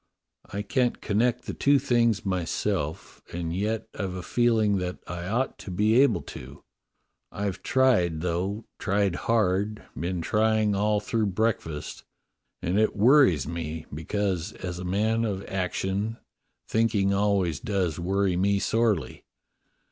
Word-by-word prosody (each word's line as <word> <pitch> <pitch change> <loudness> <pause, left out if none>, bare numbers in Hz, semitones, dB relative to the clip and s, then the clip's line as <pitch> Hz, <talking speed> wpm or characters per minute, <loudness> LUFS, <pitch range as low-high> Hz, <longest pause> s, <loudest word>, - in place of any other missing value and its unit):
I 100 +1 -3
can't 125 +3 0
connect 120 +4 +1
the - - -4
two 140 0 +4
things 120 -6 +2
myself, 90 -3 -2
and 85 -1 -3
yet 105 +3 -1
I've 95 -3 -4
a 90 - -5
feeling 110 -3 +2
that 90 0 -3
I 90 0 -5
ought 120 +7 -1
to - - -9
be 105 +7 +3
able 140 - +3
to. 65 +3 -10 0.7
I've 100 -2 -3
tried, 100 -12 +2
though, 90 +5 -2
tried 100 -2 +1
hard, 105 +1 0
been 85 +4 -3
trying 110 +1 +2
all 105 +1 +2
through 110 0 0
breakfast, 100 -7 -2 0.6
and 90 +4 +1
it 110 - +2
worries 110 - +5
me, 80 -1 -5
because, 95 +4 -2
as 90 -2 -6
a - - -5
man 110 +5 +1
of 100 -3 -2
action, 95 +3 -2 0.5
thinking 105 -3 +2
always 100 -6 +1
does 95 -5 -1
worry 95 +1 +1
me 100 +3 +2
sorely. 105 - 0
100 Hz, 135 wpm, -26 LUFS, 90-110 Hz, 0.7 s, worries